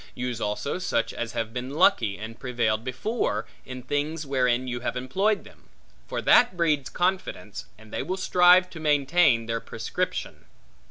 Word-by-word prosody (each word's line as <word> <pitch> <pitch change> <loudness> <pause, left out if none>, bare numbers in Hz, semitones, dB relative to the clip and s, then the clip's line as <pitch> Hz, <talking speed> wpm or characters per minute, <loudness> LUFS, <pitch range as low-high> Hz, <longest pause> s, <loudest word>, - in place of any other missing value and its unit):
Use 125 -2 -4
also 105 - -2
such 115 -10 -1
as 120 0 -4
have 115 -1 -3
been 125 +1 -4
lucky, 105 -9 +3
and 110 +3 -8
prevailed 120 -4 -1
before, 130 - -2 0.2
in 130 -1 -7
things 150 +4 -2
wherein 130 -2 +1
you 120 -1 -3
have 125 - -3
employed 195 +12 0
them; - - -18 0.4
for - - -4
that 245 -7 +5
breeds 150 -5 +1
confidence, 175 - -2
and 110 0 -16
they - - -1
will 180 +8 -3
strive 180 0 +5
to 165 - -9
maintain 145 -4 +3
their 115 0 -2
prescription. - - -4
130 Hz, 160 wpm, -26 LUFS, 115-165 Hz, 0.4 s, that